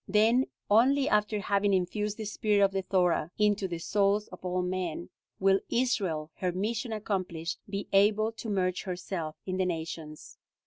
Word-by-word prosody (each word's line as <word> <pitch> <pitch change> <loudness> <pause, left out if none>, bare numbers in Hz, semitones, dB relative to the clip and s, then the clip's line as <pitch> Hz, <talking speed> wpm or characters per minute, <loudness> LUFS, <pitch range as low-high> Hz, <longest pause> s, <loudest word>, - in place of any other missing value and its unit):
Then 225 +6 +3 0.2
only, 265 +6 +4
after 210 0 +2
having 200 0 +2
infused 210 +3 -1
the 220 - -5
spirit 210 0 +2
of 195 - 0
the 195 0 -1
Thora 180 -4 +1
into 205 -2 +2
the 175 -2 -4
souls 205 +4 +1
of 180 - -12
all 180 0 -1
men, 180 - -3 0.3
will 195 0 +4
Israel, 190 -11 0
her 180 -1 -1
mission 220 +6 -2
accomplished, 185 -6 -3
be 200 0 -4
able 210 +2 +4
to 225 0 -7
merge 185 -3 0
herself 175 -3 -4
in 185 -1 -2
the 190 - +1
nations." 160 -2 -6
195 Hz, 165 wpm, -29 LUFS, 180-210 Hz, 0.3 s, only